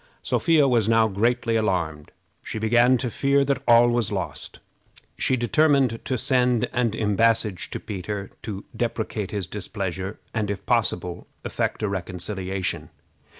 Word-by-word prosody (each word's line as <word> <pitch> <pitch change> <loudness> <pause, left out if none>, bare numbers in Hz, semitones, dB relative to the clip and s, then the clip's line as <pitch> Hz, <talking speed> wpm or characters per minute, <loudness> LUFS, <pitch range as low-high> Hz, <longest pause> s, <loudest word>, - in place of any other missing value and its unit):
Sophia 160 -4 +3
was 115 -4 +2
now 115 -1 +4
greatly 115 +3 0
alarmed. 85 -8 -1 0.3
She - - -5
began 120 +3 +4
to 125 -1 -3
fear 140 +2 +2
that 135 -1 0
all 120 0 +7
was 120 -3 +1
lost. 95 -3 -4 0.6
She 130 - +1
determined 135 -1 +2
to 130 - -1
send 125 -1 +2
an 120 -3 +1
embassage 110 -2 +1
to - - -5
Peter 100 0 -5
to 100 -3 -6
deprecate 110 -4 -2
his 100 -3 -3
displeasure, 95 0 -5
and, 105 -3 -1
if 100 - -4
possible, 90 -1 0 0.2
effect - - -2
a - - +2
reconciliation. 95 0 -3
110 Hz, 140 wpm, -24 LUFS, 95-120 Hz, 0.6 s, all